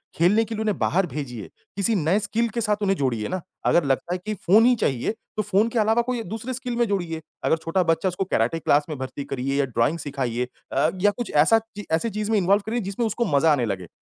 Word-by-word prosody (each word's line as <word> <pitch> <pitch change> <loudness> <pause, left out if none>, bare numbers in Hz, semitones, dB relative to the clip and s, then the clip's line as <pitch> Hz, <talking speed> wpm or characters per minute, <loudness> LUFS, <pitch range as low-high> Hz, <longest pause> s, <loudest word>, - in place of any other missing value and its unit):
खेलने 190 +7 +4
के 225 - -5
लिए 215 - -3
उन्हें 215 -2 0
बाहर 190 +2 +2
भेजिए, 125 - -6 0.3
किसी 200 +3 +1
नए 175 +2 +2
स्किल 220 +3 0
के 235 - -1
साथ 210 -2 +1
उन्हें 195 -1 +2
जोड़िए 120 -6 -1
ना, 185 0 -3 0.2
अगर 175 - +4
लगता 135 +6 0
है - - -1
कि 215 - -2
फ़ोन 210 +3 +4
ही 250 0 +5
चाहिए 135 - 0 0.3
तो - - +2
फ़ोन 205 +3 +2
के 230 - -1
अलावा 220 +2 +3
कोई 245 0 -2
एक 225 - -5
दूसरे 225 +4 -4
स्किल 250 -1 -4
में 240 - +3
जोड़िए, 175 -5 -2 0.2
अगर - - +3
छोटा 165 +3 0
बच्चा 165 +2 +1
उसको 180 +2 -2
कैराटे 165 -2 0
क्लास 145 -1 +3
में 155 - -4
भर्ती 130 +2 -5
करिए 135 +1 -2
या 140 - +3
ड्राइंग 125 +6 0
सिखाइए 130 -4 -2 0.3
अ, 145 +3 +3
या 205 +1 +5
कुछ 240 +3 -5
ऐसा 160 +10 +5
ची 220 -2 -11
ऐसी 165 +8 +1
चीज़ 210 +1 -3
में 220 - +3
इन्वॉल्व 200 +2 +3
करें 235 +2 -1
जिसमें 200 +5 -2
उसको 230 +3 -1
मज़ा 155 0 +3
आने 130 -5 +1
लगे 95 -5 -4
185 Hz, 250 wpm, -24 LUFS, 145-220 Hz, 0.3 s, ही